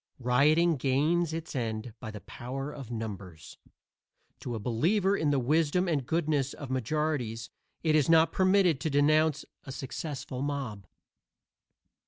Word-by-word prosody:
Rioting 150 +7 +3
gains 150 +6 +1
its 160 -1 -5
end 115 -2 -3
by 110 - -7
the 105 -2 -8
power 135 +3 -6
of 135 -6 -9
numbers. 100 -8 -7 0.8
To 120 - -5
a - - -3
believer 180 - +1
in 155 -6 +1
the 145 - +2
wisdom 155 +7 +2
and 145 -7 -1
goodness 150 -4 0
of 140 -4 -7
majorities 130 -3 -2 0.3
it 160 -2 +2
is 155 0 +3
not 165 0 +5
permitted 185 -5 +3
to 160 - 0
denounce 150 +1 +3 0.2
a 135 - -8
successful 135 0 -5
mob. 135 -9 -4
140 Hz, 140 wpm, -29 LUFS, 125-160 Hz, 0.8 s, not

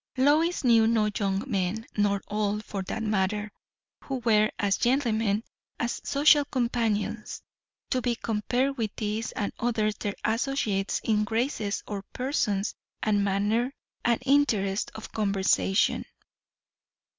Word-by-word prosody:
Lois 305 +6 +3
knew 230 -3 +5
no 220 -2 +2
young 195 -1 0
men, 205 -2 -1
nor 200 -2 +1
old, 210 0 -1
for 195 - -4
that 220 +4 -4
matter, 210 0 0 0.5
who 270 - -3
were, 215 -2 +4
as 200 -1 +1
gentlemen, 225 -5 +1 0.4
as 240 0 -2
social 290 +1 +5
companions, 230 -5 -1 0.5
to 255 - +1
be 245 -1 0
compared 245 +5 -1
with 220 -2 0
these 215 +1 -2
and 200 - -2
others 220 -3 +1
their 205 -1 -3
associates 220 -4 0
in 215 -2 +2
graces 220 -1 -1
of 205 -2 -4
person 245 -7 0 0.4
and 205 -2 +2
manner, 205 +6 +1 0.3
and 235 -1 +2
interest 220 -9 +2
of 220 - -8
conversation. 195 -1 +2
220 Hz, 125 wpm, -27 LUFS, 205-240 Hz, 0.5 s, knew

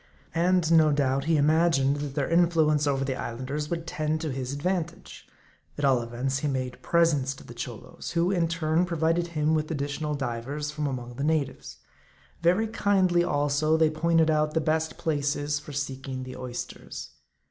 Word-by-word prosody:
And, 175 -1 +2
no 160 -2 +6
doubt, 140 -1 +1
he 160 -1 +3
imagined 150 -2 +3
that 145 -2 -5
their 140 -3 0
influence 160 -3 +3
over 135 -1 +1
the 135 -1 -1
Islanders 130 +6 -4
would 165 -1 -3
tend 155 -1 -1
to 160 -3 -2
his 130 0 -4
advant 170 +3 -1
age. - - -14 0.5
At 145 - 0
all 130 -3 +4
events, 125 +3 -2
he 150 - -1
made 130 -2 -3
presents 150 -6 +2
to - - -13
the 120 - -11
Cholos; 120 -2 -7
who, 170 +2 +2
in 175 -4 +2
turn, 165 +1 +1
provided 170 0 +1
him 150 +1 +2
with 155 -1 0
additional 150 0 -2
divers 135 +3 -3
from 150 0 -2
among 125 -3 -5
the 140 - -2
natives. 150 -3 -1 0.6
Very 180 +6 +3
kindly, 190 -5 +2
also, 145 +1 +1
they 160 -1 +3
pointed 160 0 +3
out 155 0 +1
the - - +4
best 160 +1 0
places 145 -1 -1
for 150 - -10
seeking 135 -2 -4
the 130 0 -8
oysters. 125 -1 -7
150 Hz, 175 wpm, -27 LUFS, 135-165 Hz, 0.6 s, no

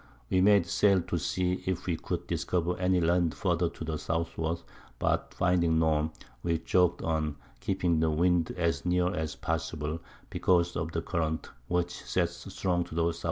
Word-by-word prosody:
We 95 - +4
made 100 -2 +5
Sail 95 +1 +3
to 90 -1 -2
see 90 +5 0
if 95 -1 -1
we 85 - 0
could - - -4
discover 90 0 0
any 90 0 +3
Land 85 -1 +2
further 85 -2 +1
to 85 - -8
the 80 -1 -2
Southward; 80 +1 -2 0.3
but - - 0
finding 85 -2 +2
none, 80 -1 +2 0.3
we 85 +1 +1
jogg'd 90 +1 +2
on, 80 -2 0 0.2
keeping 90 -4 +1
the 80 0 +3
Wind 85 +1 +2
as 85 -5 0
near 90 0 +2
as 80 -2 -3
possible, 80 +1 -2 0.3
because 90 -1 +2
of 80 0 -2
the 80 0 -2
Current, 80 -2 -2 0.2
which 90 0 0
sets 85 +1 -2
strong 90 -2 0
to - - -9
the 85 0 +2
S.W. 85 - -5
85 Hz, 170 wpm, -29 LUFS, 80-90 Hz, 0.3 s, made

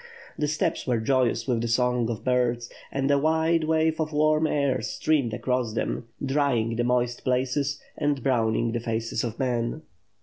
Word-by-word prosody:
The 150 - -1
steppes 150 -1 -1
were 125 -2 +2
joyous 120 0 +1
with 120 -3 +1
the 120 - -1
song 125 0 +1
of 115 -3 -4
birds; 125 -2 0 0.2
and 135 +1 0
a 140 - +4
wide 160 +2 +2
wave 160 0 +1
of 155 0 -2
warm 155 +1 +3
air 140 -4 +1
streamed 130 +2 0
across 125 +1 -1
them, 115 +1 -2 0.2
drjring 130 -5 +1
the 120 - +1
moist 120 0 0
places 130 +3 0 0.2
and 145 -3 -1
browning 115 -3 +1
the 120 - -1
faces 115 0 -2
of 115 -2 -4
men. 125 +3 -1
125 Hz, 170 wpm, -26 LUFS, 115-145 Hz, 0.2 s, a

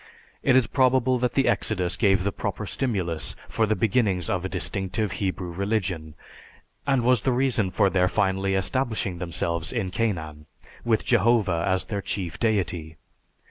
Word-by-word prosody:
It 130 - +3
is 130 -2 +5
probable 130 +1 +2
that 125 0 0
the 135 - +3
exodus 90 -4 0
gave 95 -3 +3
the 100 - 0
proper - - -4
stimulus 95 -11 -2
for 110 -1 0
the 110 - +2
beginnings 105 -6 +1
of 90 -1 -1
a 95 - -3
distinctive 95 +3 -2
Hebrew 95 -3 -3
religion, 90 -5 -2 0.7
and 135 -3 +2
was 125 -2 +3
the 130 - +1
reason 125 -6 +1
for 100 - +2
their 95 -1 +2
finally 95 0 +1
establishing 105 -3 -1
themselves 85 -1 -2
in 110 -7 -2
Canaan, 80 -9 -2 0.4
with 115 -2 +1
Jehovah 105 -7 +3
as 95 -1 +1
their 100 -2 -3
chief 95 -3 -4
deity. 90 -8 -1
100 Hz, 155 wpm, -25 LUFS, 90-115 Hz, 0.7 s, is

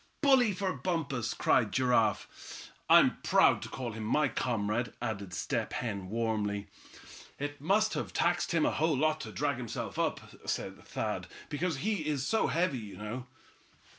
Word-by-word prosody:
"Bully 265 -6 +5
for 190 -1 -1
Bumpus," 140 -10 -2
cried 110 -4 +3
Giraffe. 125 -5 0 0.2
"I'm - - +7
proud - - +4
to - - -6
call 125 -3 -4
him 110 0 -6
my 145 +6 +2
comrade," 115 -1 -1
added 100 -4 -4
Step 85 - -2
Hen, 100 -6 -3
warmly. 105 -2 -1 0.7
"It 145 0 -5
must 210 +7 +2
have - - -3
taxed 175 +1 +1
him 165 -3 +3
a - - +2
whole 155 -2 +1
lot 155 +2 +1
to - - -6
drag 145 -3 -1
himself 120 -3 -5
up," - - +1 0.3
said - - -3
Thad, - - -3 0.2
"because 160 +1 -1
he's 155 -10 0
so 220 - +2
heavy, 165 -6 +1
you 105 -3 -9
know." 120 +4 -5
130 Hz, 155 wpm, -31 LUFS, 110-165 Hz, 0.7 s, I'm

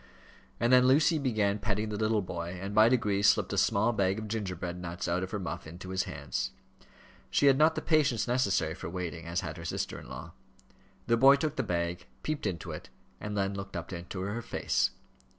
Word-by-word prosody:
And 120 +3 +3
then 125 0 +7
Lucy 150 +4 +4
began 105 -6 +1
petting 105 +1 -1
the 105 - -3
little 110 -1 +1
boy, 85 0 -5
and 95 +2 -5
by 110 +2 +6
degrees 105 -5 +2
slipped - - +3
a - - -2
small 110 +4 +2
bag 95 -2 +1
of 110 0 -5
gingerbread 90 -5 -4
nuts 85 +1 -5
out 85 +2 0
of 95 - -3
her 105 - -3
muff 90 -5 -5
into 90 +3 -9
his 95 0 0
hands. - - -4 0.8
She - - +2
had 135 -1 +7
not 155 +3 +4
the - - -3
patience 150 -9 +2
necessary 100 -10 +1
for 85 - -7
waiting, 85 -2 -5
as 85 +2 -1
had 80 -4 -6
her 85 - -8
sister - - -3
in - - -12
law. - - -8 0.7
The 115 0 +3
boy 135 +3 +8
took 150 +2 -2
the - - 0
bag, 85 0 -2 0.2
peeped 155 -1 -2
into 85 -4 -4
it, - - -8 0.3
and 105 0 -4
then 100 0 0
looked 100 0 -7
up 85 +2 -6
into 90 +2 -6
her 105 +5 -3
face. - - 0
100 Hz, 210 wpm, -30 LUFS, 90-115 Hz, 0.8 s, boy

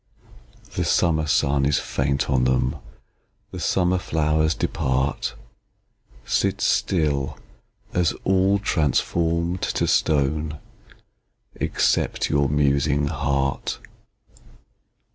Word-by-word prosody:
The - - -1
summer 80 -3 +1
sun 70 -2 +2
is 70 0 +2
faint 70 +1 -1
on 65 -3 +2
them, 65 0 +1 0.7
The - - -7
summer 90 0 +1
flowers 80 -1 +1
depart, 65 +2 -1 0.9
Sit - - 0
still, 75 -6 0 0.6
as 85 -2 +2
all 95 +1 +3
transform'd 85 0 0
to - - 0
stone, 75 +1 +1 1.0
Except - - 0
your 70 -1 +2
musing 70 0 +1
heart. 70 -2 -1
75 Hz, 85 wpm, -23 LUFS, 70-80 Hz, 1.0 s, all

